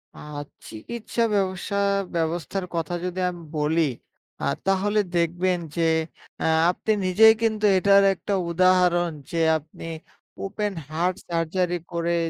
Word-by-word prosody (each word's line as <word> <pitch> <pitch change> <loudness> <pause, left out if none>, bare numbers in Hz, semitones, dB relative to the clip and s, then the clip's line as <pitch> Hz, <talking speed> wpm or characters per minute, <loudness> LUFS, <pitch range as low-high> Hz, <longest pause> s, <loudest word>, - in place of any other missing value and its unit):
আ - - -12 0.5
চিকিৎসা 230 - -4
ব্যবসা 190 0 -1 0.4
ব্যবস্থার 170 +3 -2
কথা 165 +1 -2
যদি 180 +1 -3
আমি 175 -2 -8
বলি 155 +1 +2 0.5
আ - - +1 0.2
তাহলে 205 +2 +2 0.2
দেখবেন 175 +2 +1 0.2
যে 170 - +2 0.6
আ - - 0 0.3
আপনি 220 - -2
নিজেই 220 +5 +7
কিন্তু 215 -1 +1
এটার 200 +1 +5
একটা 195 +2 -4 0.2
উদাহরণ 180 -1 +3 0.2
যে 170 - -1 0.2
আপনি 155 +2 -12 0.5
'ওপেন 205 +1 -2 0.2
হার্ট 175 +4 0
সার্জারি' 175 +1 0
করে 170 0 0
180 Hz, 120 wpm, -24 LUFS, 170-195 Hz, 0.6 s, নিজেই